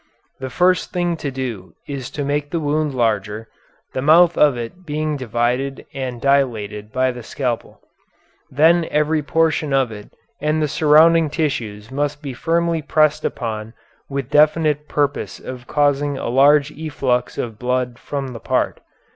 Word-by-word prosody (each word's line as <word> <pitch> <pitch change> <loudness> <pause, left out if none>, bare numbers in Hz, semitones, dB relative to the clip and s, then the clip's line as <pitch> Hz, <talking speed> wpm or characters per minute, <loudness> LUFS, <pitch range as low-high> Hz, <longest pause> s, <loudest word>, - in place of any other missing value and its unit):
The 130 0 -5
first 180 +6 +2
thing 175 -1 0
to 145 - -3
do 120 -10 -6
is 135 -3 -5
to 145 - -4
make 145 +1 -1
the 170 - -1
wound 150 -1 -1
larger, 110 -2 -1 0.5
the 130 - -2
mouth 165 +4 +5
of 145 -4 +4
it 120 +10 -7
being 155 -1 -2
divided 125 +2 -1
and 130 -3 -4
dilated 110 -7 0
by 130 +2 +1
the 125 0 -8
scalpel. 120 0 -4 0.7
Then 165 +4 +4
every 150 +1 +1
portion 160 -1 +1
of 135 -4 +2
it 105 -1 -10 0.3
and 150 +1 +1
the 155 - +1
surrounding 160 +2 +5
tissues 120 -9 -3
must 145 +2 -2
be 140 -3 -5
firmly 165 +4 0
pressed 155 0 +2
upon 110 -2 -4 0.3
with 140 -1 -4
the - - +3
definite 150 -1 +2
purpose 145 -1 -1
of 125 -1 -9
causing 145 -1 +1
a - - -3
large 140 +3 +4
efflux 140 -6 -2
of 115 -3 -4
blood 125 -1 -1
from 140 -2 -4
the 120 -2 -8
part. - - -1
140 Hz, 155 wpm, -20 LUFS, 125-155 Hz, 0.7 s, mouth